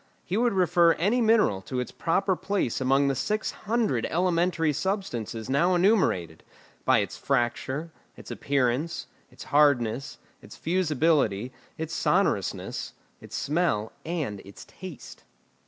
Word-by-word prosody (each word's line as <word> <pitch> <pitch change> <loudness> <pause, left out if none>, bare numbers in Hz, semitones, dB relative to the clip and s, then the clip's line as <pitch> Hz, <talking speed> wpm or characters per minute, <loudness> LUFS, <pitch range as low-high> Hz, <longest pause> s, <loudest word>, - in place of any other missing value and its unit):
He 180 - -2
would 235 +1 +2
refer 175 -2 +4
any 215 +9 +1
mineral 220 - +3
to 125 +6 -4
its 125 - -4
proper 190 +3 0
place 190 - -1
among 135 +2 +3
the 135 - +2
six 210 +12 -1
hundred 215 - -1
elementary 170 -2 +1
substances 140 - -3
now 170 +8 +2
enumerated, 175 - +2 0.4
by - - +4
its - - -5
fracture, 135 +4 -1 0.3
its - - -10
appearance, 140 +4 -1 0.2
its - - -11
hardness, 140 -3 +2 0.2
its - - -13
fusibility, 150 - +1 0.2
its 160 +1 -4
sonorousness, - - 0 0.3
its - - -10
smell, 145 -8 0
and 155 - -3
its 100 +1 -12
taste. 185 -7 -11
155 Hz, 125 wpm, -26 LUFS, 130-185 Hz, 0.4 s, refer